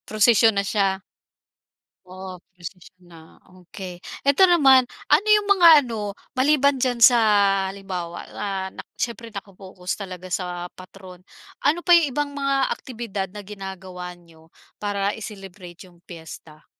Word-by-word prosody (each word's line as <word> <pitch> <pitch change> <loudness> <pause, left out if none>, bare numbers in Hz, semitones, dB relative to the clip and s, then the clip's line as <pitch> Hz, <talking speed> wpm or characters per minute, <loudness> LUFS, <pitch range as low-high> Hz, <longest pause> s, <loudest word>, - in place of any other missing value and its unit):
Prusisyon 220 0 +4
na 200 - +1
siya. 195 -1 0 1.0
Po 185 0 -10 0.2
prusisyon 180 +1 -12
na, 160 -1 -16 0.2
okey. 180 0 -10 0.2
Eto 280 +6 +4
naman, 270 -7 +5 0.2
ano 325 +9 +3
yung 420 -1 +4
mga 360 -3 +5 0.2
ano, 210 -4 -5 0.2
maliban 280 +1 +3
diyan 250 -1 0
sa 240 +1 +7 0.5
halimbawa 185 -3 -6
na, - - -5 0.3
nak - - -11
syempre 235 -1 -4
naka-focus 195 -2 -8
talaga 185 -2 -8
sa 175 -1 -3
patron, 185 -1 -14 0.4
ano 300 +5 +2
pa 350 - +5
yung 335 -4 +5
ibang 285 +2 -3
mga 275 -1 -1 0.2
aktibidad 225 -6 -6
na 205 +1 -10
ginagawa 190 -3 -8
niyo, 165 -2 -21 0.3
para 205 -1 -1
i-celebrate 195 -4 -10
yung 175 -2 -21
piyesta? 160 -3 -12
195 Hz, 130 wpm, -23 LUFS, 180-245 Hz, 1.0 s, sa